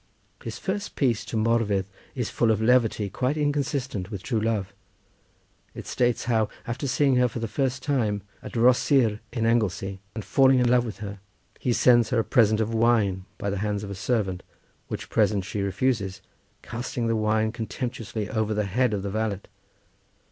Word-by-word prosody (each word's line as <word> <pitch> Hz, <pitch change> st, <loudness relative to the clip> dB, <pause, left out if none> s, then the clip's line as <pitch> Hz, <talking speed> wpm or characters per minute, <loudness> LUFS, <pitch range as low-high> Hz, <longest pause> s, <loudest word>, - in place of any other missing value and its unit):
His -, -, -5 dB
first 200 Hz, +1 st, -4 dB
piece 120 Hz, -6 st, +1 dB
to 115 Hz, -, -3 dB
Morfudd 110 Hz, -3 st, +1 dB, 0.3 s
is 125 Hz, -4 st, -2 dB
full 115 Hz, -, +2 dB
of 110 Hz, -2 st, +3 dB
levity 115 Hz, -2 st, +3 dB
quite 130 Hz, +8 st, -1 dB
inconsistent 140 Hz, -, -1 dB
with 100 Hz, -4 st, -6 dB
true 115 Hz, -5 st, -1 dB
love. 105 Hz, -4 st, -1 dB, 1.0 s
It -, -, -7 dB
states 120 Hz, -1 st, 0 dB
how, 110 Hz, -3 st, +1 dB, 0.2 s
after 125 Hz, +4 st, -3 dB
seeing 130 Hz, 0 st, +3 dB
her 125 Hz, 0 st, +4 dB
for 120 Hz, -, -7 dB
the 115 Hz, 0 st, -2 dB
first 130 Hz, +2 st, -1 dB
time 110 Hz, -8 st, 0 dB, 0.2 s
at -, -, -9 dB
Rhosyr 120 Hz, -1 st, +4 dB
in 115 Hz, -2 st, -1 dB
Anglesey, 100 Hz, -4 st, 0 dB, 0.2 s
and 110 Hz, -4 st, -5 dB
falling 135 Hz, +4 st, +5 dB
in 125 Hz, -1 st, +3 dB
love 120 Hz, 0 st, +4 dB
with 105 Hz, -, -6 dB
her, 100 Hz, 0 st, -7 dB, 0.4 s
he 125 Hz, -, 0 dB
sends 120 Hz, -1 st, +4 dB
her 120 Hz, -, +1 dB
a 115 Hz, -, +3 dB
present 110 Hz, -2 st, +3 dB
of 110 Hz, +1 st, -1 dB
wine 110 Hz, -5 st, +2 dB
by 100 Hz, -1 st, -2 dB
the 100 Hz, -, -2 dB
hands 105 Hz, 0 st, -1 dB
of 100 Hz, -, -6 dB
a -, -, -3 dB
servant, 100 Hz, -2 st, -1 dB, 0.5 s
which -, -, -6 dB
present 105 Hz, -3 st, +2 dB
she 100 Hz, +1 st, -3 dB
refuses, 100 Hz, 0 st, -1 dB, 0.4 s
casting 120 Hz, 0 st, -4 dB
the 115 Hz, 0 st, +1 dB
wine 110 Hz, 0 st, +1 dB
contemptuously 115 Hz, -2 st, -4 dB
over 110 Hz, -1 st, -1 dB
the 105 Hz, 0 st, 0 dB
head 110 Hz, +3 st, +1 dB
of 100 Hz, -, -4 dB
the 100 Hz, -, -3 dB
valet. 110 Hz, -2 st, -1 dB
115 Hz, 180 wpm, -26 LUFS, 105-125 Hz, 1.0 s, falling